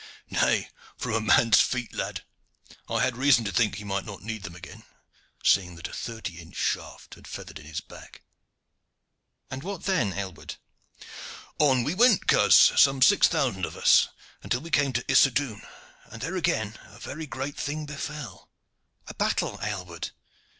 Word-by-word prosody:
"Nay, - - +1 0.3
from 125 - -3
a 115 - +1
man's 110 +1 +5
feet, 125 -2 -2
lad. - - -4 0.7
I - - +1
had 130 - 0
reason 125 -3 +4
to 100 - -2
think 105 +3 +2
that - - -6
he 105 - -7
might 100 -1 -2
not 100 -2 -9
need 110 0 -5
them 85 -3 -8
again, 90 +1 -12 0.6
seeing 90 -2 +3
that 85 - -6
a - - -13
thirty 110 -7 -6
inch 85 -1 -13
shaft - - -3
had - - -14
feathered - - -8
in 75 - -14
his 80 -1 -5
back." - - -14 1.3
"And 130 +1 -5
what 195 +2 -6
then, 180 - +1
Aylward?" 95 -3 -6 1.0
"On 130 -5 +4
we 150 - -1
went, 230 +1 +4
coz, - - +5
some 135 -2 +6
six 205 - +6
thousand 130 - -1
of - - -4
us, - - +5 0.3
until 125 - -2
we 165 +2 -10
came 145 -3 +2
to 125 +1 -1
Issodun, 130 -5 +3 0.4
and 115 0 -10
there 190 - -3
again 110 - -1
a 110 -1 -16
very 155 +6 -7
great 135 +1 -5
thing 150 +1 -3
befell." 150 -2 -7 0.6
"A - - -9
battle, - - -1
Aylward?" 90 -5 -5
120 Hz, 170 wpm, -26 LUFS, 100-145 Hz, 1.3 s, some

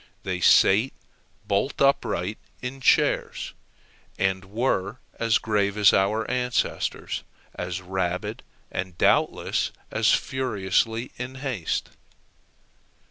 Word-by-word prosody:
They 90 -1 -2
sate 105 +7 +5 0.5
bolt 100 +8 0
upright 110 -7 +1 0.2
in 130 +2 -6
chairs, - - +2 0.6
and 95 0 0
were 105 0 -1 0.2
as 115 -1 +3
grave 105 -2 0
as 105 -2 +6
our 105 +3 +2
ancestors, 125 -1 -1 0.3
as 90 +1 -4
rabid, 95 +3 -2 0.3
and 90 -1 -4
doubtless - - +2 0.2
as - - +3
furiously 115 -1 0
in 125 +1 -5
haste. 130 - -3
105 Hz, 95 wpm, -25 LUFS, 95-125 Hz, 0.6 s, as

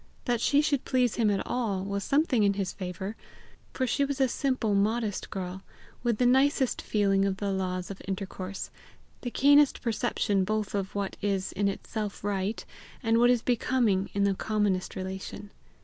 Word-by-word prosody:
That 240 -3 0
she 285 0 +4
should 285 -3 +1
please 250 -3 +2
him 225 -3 +3
at 200 -1 0
all, 215 -7 -1
was 200 0 -2
something 275 -3 +2
in 200 -1 +4
his 195 -2 -2
favour, 190 +2 -5 0.6
for 260 - -1
she 280 +3 +1
was 280 0 -2
a 265 - +4
simple, 255 -4 0
modest 210 +1 0
girl, 190 -1 -5 0.4
with 235 -3 +1
the 250 - +2
nicest 265 +1 +3
feeling 195 -2 +2
of 195 -1 0
the 200 0 -2
laws 185 -1 -2
of 195 - -9
intercourse, 190 0 -5 0.5
the 245 - -3
keenest 285 +3 +4
perception 210 -4 0
both 215 +1 -1
of 195 -1 -3
what 200 -1 -2
is 195 -2 -1
in 200 +1 0
itself 205 +1 -4
right, 200 +1 -2 0.4
and 225 0 +3
what 240 +1 +6
is 245 -2 +3
becoming 235 -5 +1
in 200 - +2
the 200 -1 +3
commonest 205 -2 -1
relation. 190 +2 -6
205 Hz, 175 wpm, -28 LUFS, 195-245 Hz, 0.6 s, what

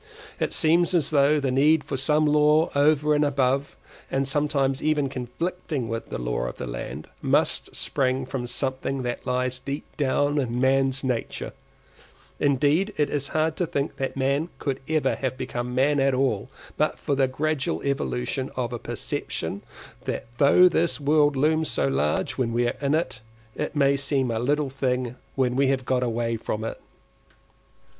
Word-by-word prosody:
It - - 0
seems 170 +3 +3
as 165 -3 +2
though 145 +1 +4
the 135 -2 0
need 145 +4 +4
for 140 0 -4
some 150 +3 +2
law 150 +2 +4
over 150 +1 +3
and 150 0 +3
above, 135 -1 0 0.3
and 135 0 0
sometimes 140 -2 0
even 150 -3 +1
conflicting 140 +2 -4
with, 115 0 -4
the - - -4
law - - -2
of - - -6
the - - -4
land, - - -6
must - - +1
spring 130 -1 0
from 130 -2 -4
something 130 +1 -2
that 120 +1 -4
lies 125 0 0
deep 140 +2 -5
down 145 +1 +1
in 125 -3 -1
man's 135 +1 +2
nature; 125 -3 -3 0.9
indeed, 145 +9 +2
it 150 - +1
is 140 -1 -1
hard 155 0 0
to 180 - 0
think 145 -3 -2
that 135 0 -3
man 140 +5 +1
could 135 -2 -2
ever 155 -1 +1
have 130 -1 -2
become 125 0 -4
man 140 +3 +3
at 135 -1 +3
all, 130 -5 0 0.3
but 155 - +1
for 145 - -2
the 135 -1 +3
gradual 145 +2 -1
evolution 130 - -2
of 125 -2 -2
a 120 - -4
perception - - -4 0.4
that - - -3
though 150 +6 +7
this 170 -2 +1
world 145 0 +3
looms 155 +3 +2
so - - 0
large 70 - 0
when 120 -3 +1
we 120 +1 +2
are 120 - -1
in 140 +1 +2
it, 160 -8 -2 0.4
it 150 - -3
may 140 -1 +4
seem 135 -2 0
a 110 - -1
little 145 +3 0
thing 125 -2 -1 0.2
when 125 -2 +1
we 135 +1 +3
have 130 -1 0
got 130 -1 +1
away 115 -1 -1
from 110 0 -4
it. 115 - -5
135 Hz, 175 wpm, -25 LUFS, 125-150 Hz, 0.9 s, though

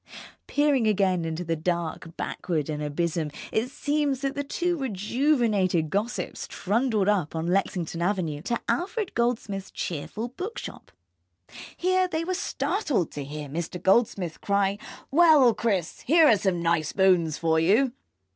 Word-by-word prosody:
Peering 285 -5 +2
again 190 -4 +2
into 165 +2 -3
the 165 -1 -1
dark 165 0 -3
backward 160 -5 -2
and 150 0 -4
abysm, 155 +1 -1 0.2
it 225 +3 0
seems 285 -1 -1
that 275 -1 -1
the 285 0 -3
two 350 +5 -1
rejuvenated 215 - +1
gossips 215 +5 -2
trundled 215 0 0
up 185 -7 +1
on 160 0 -2
Lexington 175 -2 -1
Avenue 170 -6 -1
to 235 +7 -2
Alfred 395 +3 -1
Goldsmith's 225 -5 -1
cheerful 195 +8 -4
bookshop. 360 - -7 0.9
Here 370 +1 +2
they 330 -2 -2
were 370 +2 -2
startled 350 - -1
to 145 - -5
hear 150 +1 -6
Mr. 170 +4 -4
Goldsmith 190 -4 +1
cry: 200 0 +1 0.3
"Well, 300 -6 +6
Chris, 195 -9 -1
here 325 +4 +5
are 225 - +7
some 185 -3 -1
nice 165 -2 +1
bones 180 -5 +3
for 160 -1 +2
you." 215 +11 +3
200 Hz, 140 wpm, -26 LUFS, 170-270 Hz, 0.9 s, are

